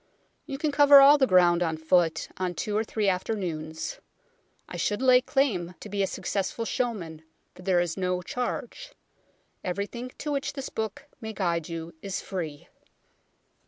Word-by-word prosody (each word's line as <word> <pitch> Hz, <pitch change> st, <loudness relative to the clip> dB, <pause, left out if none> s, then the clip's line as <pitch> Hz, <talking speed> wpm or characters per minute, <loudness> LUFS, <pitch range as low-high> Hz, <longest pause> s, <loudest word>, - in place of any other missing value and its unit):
You 275 Hz, -3 st, -4 dB
can 300 Hz, +1 st, 0 dB
cover 285 Hz, 0 st, +8 dB
all 285 Hz, +2 st, +8 dB
the 265 Hz, -, +4 dB
ground 180 Hz, -2 st, +5 dB
on 160 Hz, -2 st, 0 dB
foot 165 Hz, +1 st, +2 dB
on 180 Hz, -1 st, -2 dB
two 210 Hz, -, -3 dB
or 215 Hz, -, +2 dB
three 215 Hz, -2 st, -1 dB
afternoons. 180 Hz, -, -2 dB, 0.7 s
I -, -, -8 dB
should 205 Hz, -, -1 dB
lay 255 Hz, -1 st, +6 dB
claim 215 Hz, -11 st, 0 dB
to 210 Hz, -, -9 dB
be 200 Hz, 0 st, -1 dB
a 195 Hz, -, +2 dB
successful 200 Hz, +5 st, -3 dB
showman, 195 Hz, -12 st, -3 dB, 0.3 s
for -, -, -14 dB
there 180 Hz, -1 st, +2 dB
is 175 Hz, -1 st, -1 dB
no 180 Hz, -1 st, -1 dB
charge; 245 Hz, +7 st, -4 dB, 0.7 s
everything 205 Hz, +7 st, -4 dB
to 300 Hz, -, -4 dB
which 280 Hz, -1 st, -2 dB
this 275 Hz, -2 st, -5 dB
book 220 Hz, +6 st, -4 dB, 0.2 s
may 220 Hz, -1 st, -5 dB
guide 170 Hz, -5 st, -1 dB
you 165 Hz, 0 st, -6 dB
is 195 Hz, -1 st, -3 dB
free. 160 Hz, -6 st, -6 dB
195 Hz, 160 wpm, -27 LUFS, 175-250 Hz, 0.7 s, cover